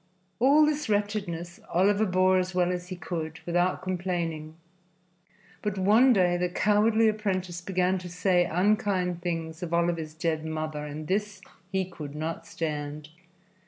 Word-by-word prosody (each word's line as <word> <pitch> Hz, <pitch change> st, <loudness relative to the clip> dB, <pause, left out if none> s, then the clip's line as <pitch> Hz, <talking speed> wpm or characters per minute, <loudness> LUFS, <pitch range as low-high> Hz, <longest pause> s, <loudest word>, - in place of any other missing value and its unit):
All 285 Hz, +5 st, +6 dB
this 300 Hz, -3 st, -1 dB
wretchedness 200 Hz, -5 st, -2 dB
Oliver 200 Hz, +4 st, +3 dB
bore 185 Hz, 0 st, +3 dB
as 185 Hz, 0 st, -3 dB
well 180 Hz, -1 st, +2 dB
as 180 Hz, 0 st, -4 dB
he 185 Hz, -, -5 dB
could, 160 Hz, -3 st, -5 dB
without 175 Hz, +1 st, +1 dB
complaining. 170 Hz, -4 st, -3 dB, 1.1 s
But 210 Hz, -2 st, -2 dB
one 215 Hz, +7 st, +5 dB
day 180 Hz, -5 st, +3 dB
the 180 Hz, 0 st, 0 dB
cowardly 215 Hz, +4 st, +3 dB
apprentice 185 Hz, -5 st, -1 dB
began 185 Hz, 0 st, 0 dB
to 180 Hz, 0 st, -8 dB
say 180 Hz, 0 st, +2 dB
unkind 180 Hz, -1 st, +1 dB
things 165 Hz, -1 st, -4 dB
of 170 Hz, -1 st, -2 dB
Oliver's 170 Hz, -2 st, -1 dB
dead 160 Hz, -1 st, -1 dB
mother, 155 Hz, -1 st, -4 dB
and 150 Hz, +1 st, -6 dB
this 205 Hz, 0 st, -1 dB, 0.3 s
he 190 Hz, -1 st, 0 dB
could 150 Hz, -5 st, -9 dB
not 160 Hz, +2 st, -4 dB
stand. 150 Hz, -1 st, -4 dB
180 Hz, 145 wpm, -27 LUFS, 165-195 Hz, 1.1 s, All